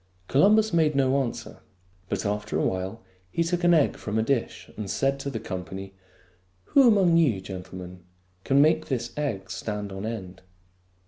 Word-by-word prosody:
Columbus 210 +8 +4
made 155 -3 +3
no 135 0 +3
answer; 120 -3 -5 0.5
but 100 0 -2
after 105 +1 -2
a - - +1
while 95 +4 -3 0.3
he 170 - 0
took 175 +1 -1
an 175 0 +6
egg 155 - +2
from 105 +1 -3
a 110 - +2
dish 125 -1 -2
and 105 -2 -5
said 135 +7 0
to 140 - -4
the 120 -5 -4
company, 95 -1 -6 0.4
" 90 0 -38
Who 275 -3 +7
among 190 -7 +5
you, 135 -12 +3
gentlemen, 90 -1 -9 0.4
can 140 +1 +4
make 155 +1 +2
this 120 -3 -3
egg 110 -11 -3
stand 105 0 -4
on 95 +3 -5
end 95 -5 -6
115 Hz, 175 wpm, -26 LUFS, 95-150 Hz, 0.5 s, Who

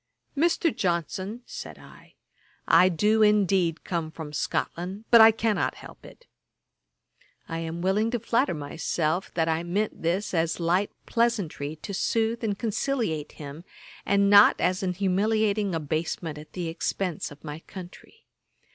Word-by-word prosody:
'Mr. 330 +1 +2
Johnson, 185 - -2
(said - - -8
I) - - -17 0.5
I 180 +3 +6
do 210 +6 +2
indeed 195 -6 +3
come 170 -3 -3
from 160 -2 -8
Scotland, 180 +7 -3
but 235 -1 +9
I 220 - +10
cannot 225 -1 0
help - - -13
it.' 485 - -17 1.2
I 165 0 -4
am 165 +1 -5
willing 205 +4 +2
to 240 0 -1
flatter 230 -1 +1
myself 155 +4 -2
that 165 -1 +1
I 160 0 +1
meant 195 +5 -2
this 180 +6 -1
as 165 -1 0
light 175 +4 +1 0.2
pleasantry 200 -11 -1
to 200 - -5
sooth 225 +3 0
and 205 -3 -1
conciliate 220 - -2
him, 145 +2 -9 0.4
and 200 0 +3
not 205 +1 +7
as 185 +2 +1
an 185 -2 -1
humiliating 200 +1 +1
abasement 155 0 -3
at 155 - -14
the 175 -2 -3
expence 170 +1 -3
of 145 0 -14
my 150 0 -6
country. 185 - -12
185 Hz, 145 wpm, -26 LUFS, 165-215 Hz, 1.2 s, I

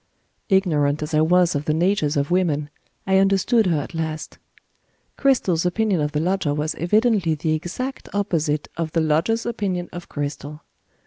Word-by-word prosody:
Ignorant 155 -7 +2
as 150 - -6
I 155 - +4
was 175 +2 +3
of 145 0 -2
the 155 - +1
natures 165 -4 +1
of 140 +3 -1
women, 150 -5 0 0.3
I 190 0 +3
understood 195 +3 +3
her 165 -4 +2
at 145 - -7
last. 160 -1 -4 0.8
Cristel's 215 - +2
opinion 185 -1 +1
of 150 0 -1
the 150 - -1
lodger 175 -3 0
was 150 +1 -1
evidently 205 -2 +2
the 155 +1 -1
exact 185 +12 -4
opposite 160 -7 -1
of 165 -2 -3
the 165 - +2
lodger's 165 +9 +1
opinion 195 -7 -2
of 175 0 -8
Cristel. 145 +1 -5
170 Hz, 165 wpm, -22 LUFS, 150-195 Hz, 0.8 s, I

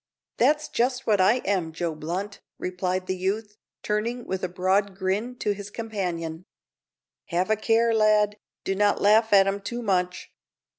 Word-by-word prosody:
"That's 300 +5 +3
just 250 +2 0
what 205 -3 +3
I 215 +7 +4
am, 185 -5 0
Joe 165 0 -2
Blunt," 175 +7 -5 0.2
replied 185 0 -2
the 185 - -2
youth, 205 +3 -2 0.3
turning 230 +3 -2
with 190 0 -4
a 185 - -1
broad 190 +2 +1
grin 200 +6 -2
to 210 -4 -1
his 205 0 -8
companion. 180 -7 -4 0.8
"Have 185 +3 0
a - - +5
care, 225 +2 +2
lad; 210 -1 +3 0.3
do 195 - -1
not 205 +1 +2
laugh 220 +2 +4
at 195 -1 +7
'em 195 +1 -1
too 240 +4 -5
much. 180 -3 -1
200 Hz, 160 wpm, -25 LUFS, 185-220 Hz, 0.8 s, at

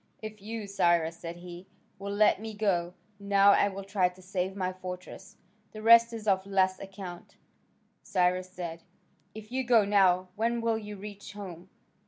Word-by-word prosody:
"If 215 -1 -8
you, 220 +1 -5
Cyrus," 170 -4 +1
said 170 0 -6
he, 175 +1 -10 0.3
"will 200 0 -5
let 205 0 +3
me 220 -1 -6
go 180 -4 0 0.2
now, 200 0 +5
I 200 - +4
will 195 0 -6
try 195 -2 +1
to 180 +1 -19
save 185 0 -3
my 185 -2 -2
fortresses: 185 +2 -9 0.4
the 215 0 -8
rest 230 +1 +7
is 225 -2 -7
of 190 -1 +3
less 190 -1 +2
account." 190 -3 -9 0.7
Cyrus 180 0 0
said, 170 -3 -6 0.5
"If 215 +1 -10
you 260 +1 -1
go 235 -4 +4
now, 185 -2 +3
when 235 +2 0
will 230 -1 0
you 210 -1 -8
reach 205 +1 -9
home?" 185 -3 -9
195 Hz, 170 wpm, -29 LUFS, 180-210 Hz, 0.7 s, rest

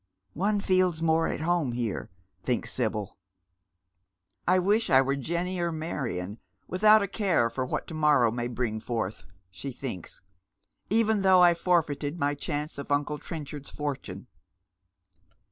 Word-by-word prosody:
" 95 - -46 0.2
One 210 -1 +1
feels 185 -4 +2
more 165 0 +3
at - - -3
home 165 -6 +1
here," 120 -4 -3 0.3
thinks 125 +4 -1
Sibyl. 110 -5 -2 0.6
" 90 0 -49
I 185 +1 +5
wish 205 +5 +2
I 130 - +7
were 135 +1 +2
Jenny 170 +6 -2
or 170 -1 0
Marion, 120 - -4 0.3
without 210 +3 +5
a - - -1
care 185 - +1
for 130 +2 -2
what - - -2
to» - - -9
morrow 150 -7 +4
may 120 +1 -2
bring 120 -3 -2
forth," 110 -3 -3 0.3
sh» 90 +8 -10
thinks; 105 -13 -7 0.3
" - - -42 0.3
even 220 -1 +2
though 190 -2 +6
I 175 -1 +7
forfeited 165 -3 0
my 145 -2 +1
chance 145 +1 -4
of 140 - -7
uncle 145 +1 0
Trenchard's 150 -4 -7
fortune." 135 -10 -5
145 Hz, 155 wpm, -28 LUFS, 120-175 Hz, 0.6 s, I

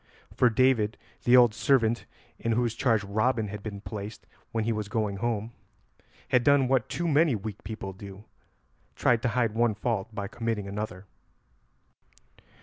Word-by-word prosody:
For 125 - +4
David, 115 -2 +2 0.3
the 125 +1 +7
old 120 -3 +6
servant 120 -2 +2 0.3
in 115 - 0
whose 120 0 +1
charge 115 -4 +1
Robin 110 +2 0
had 105 0 -6
been 100 -2 -6
placed 105 0 -7 0.3
when 115 -3 -1
he 115 +1 0
was 105 -1 -3
going 105 -2 -1
home, 115 +1 -2 0.8
had 125 -1 +3
done 140 0 +4
what 130 -3 +1
too 175 - -2
many 155 -3 +3
weak 105 -1 -6
people 100 -2 -6
do, 100 +1 -11 0.7
tried 120 -2 +2
to - - 0
hide 115 -4 +2
one 115 -1 +2
fault 110 -1 -1
by 100 -2 -4
committing 115 -2 -3
another. 100 -1 -5
110 Hz, 155 wpm, -28 LUFS, 105-120 Hz, 0.8 s, the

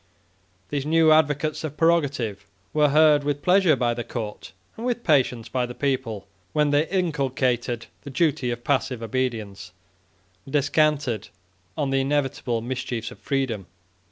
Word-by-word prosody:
These 145 -1 -2
new 160 0 +5
advocates 155 +1 +2
of 155 -1 -5
prerogative 135 -12 +1 0.3
were 150 -1 +4
heard 150 0 +5
with 145 0 -2
pleasure 180 -4 +5
by 120 -2 +1
the 120 0 -4
court, 110 -4 -6 0.2
and 225 - -8
with 245 -1 -1
patience 125 -6 +2
by 125 0 -1
the 125 - -8
people, 130 -7 -2 0.3
when 150 -1 +2
they 145 +2 +2
inculcated 130 - 0 0.2
the 140 - -9
duty 140 -3 +1
of 120 0 -4
passive 130 -3 0
obedience, 110 -6 -3 0.8
and 135 - -10
descanted 145 -5 +1 0.5
on 140 -2 0
the 135 0 +2
inevitable 135 -4 -1
mischiefs 120 -2 -4
of - - -13
freedom. 130 -9 -2
135 Hz, 145 wpm, -24 LUFS, 120-150 Hz, 0.8 s, new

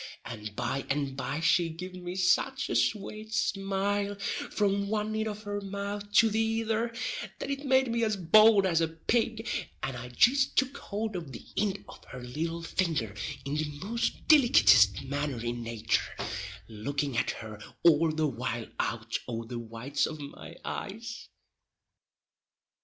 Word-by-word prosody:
And 105 -2 -7
by 125 +3 -1
and 140 -1 -1
by 140 +3 -3
she 170 0 +3
gived 180 +3 -7
me 180 0 -5
such 225 +9 +2
a - - 0
swate 215 +1 -1
smile, 200 +1 0 0.3
from 200 -1 +1
one 215 +1 -1
ind 220 0 -1
of 215 0 -5
her 205 -1 -3
mouth 200 +1 -5
to 225 - +6
the 220 - +1
ither, 225 +1 0 0.5
that 280 - -4
it 280 +1 -4
made 260 -2 +4
me 230 0 +1
as 215 -2 +1
bould 205 +3 +6
as 170 -3 +2
a 165 - +3
pig, 225 +7 -1 0.4
and 135 - -2
I 125 0 -7
jist 260 - +3
took 265 +1 +2
hould 215 0 -4
of 165 -6 -5
the 115 - -9
ind 200 -2 -1
of - - -12
her 130 - -9
little 165 +7 -3
finger 160 - -1 0.3
in 140 +2 -2
the 155 -1 -1 0.2
most 230 +3 -2
dilikittest 135 - +6
manner 140 -2 -2
in 120 +1 -3
natur, 115 -1 -1 0.5
looking 135 +5 -3
at 120 - +1 0.2
her 110 -1 -8 0.2
all 165 -1 +5
the 155 0 0
while 120 -4 -2
out 115 0 -1
o' 115 -1 -3
the 120 +1 -5
whites 115 +4 -2
of 155 -1 -7
my 140 -1 -9
eyes. 225 +3 -6
175 Hz, 160 wpm, -29 LUFS, 130-215 Hz, 0.5 s, to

